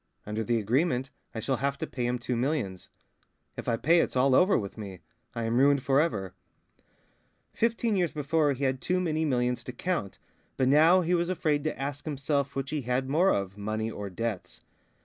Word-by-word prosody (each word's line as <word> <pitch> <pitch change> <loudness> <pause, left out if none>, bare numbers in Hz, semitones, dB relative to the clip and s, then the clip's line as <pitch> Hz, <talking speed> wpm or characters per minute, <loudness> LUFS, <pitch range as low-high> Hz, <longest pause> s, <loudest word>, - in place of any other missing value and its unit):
Under 105 +1 -2
the 120 +1 +1
agreement, 130 - 0 0.2
I - - -2
shall 130 +4 -1
have 140 +1 -1
to - - -3
pay 120 -1 -3
him 125 0 0
two 125 +1 -3
millions. 120 - -2 0.7
If - - -7
I 115 - +1
pay, 165 +8 +4
it's - - 0
all 130 +1 +4
over 185 +8 +5
with 100 -3 -4
me. 95 -4 -8 0.3
I 115 - -2
am 115 +2 +1
ruined 140 -1 +4
for 135 +1 +4
ever 100 - -2 0.6
..." - - -38 0.5
Fifteen 230 -1 +1
years 175 -4 +1
before 150 0 +1
he 135 +2 -5
had 130 -1 0
too 180 0 0
many 160 -3 0
millions 125 -3 0
to - - -5
count, 130 - -3 0.4
but 130 - +2
now 160 +7 +6
he 175 +1 0
was 175 0 +1
afraid 155 -5 0
to 155 - -2
ask 140 +1 -4
himself 140 -1 -1
which 135 0 -3
he 155 -2 -1
had 125 +2 -1
more 175 +6 +4
of, 100 - -1
money 110 +2 -2
or 105 -2 -6
debts. 110 0 -4
135 Hz, 205 wpm, -28 LUFS, 115-155 Hz, 0.7 s, now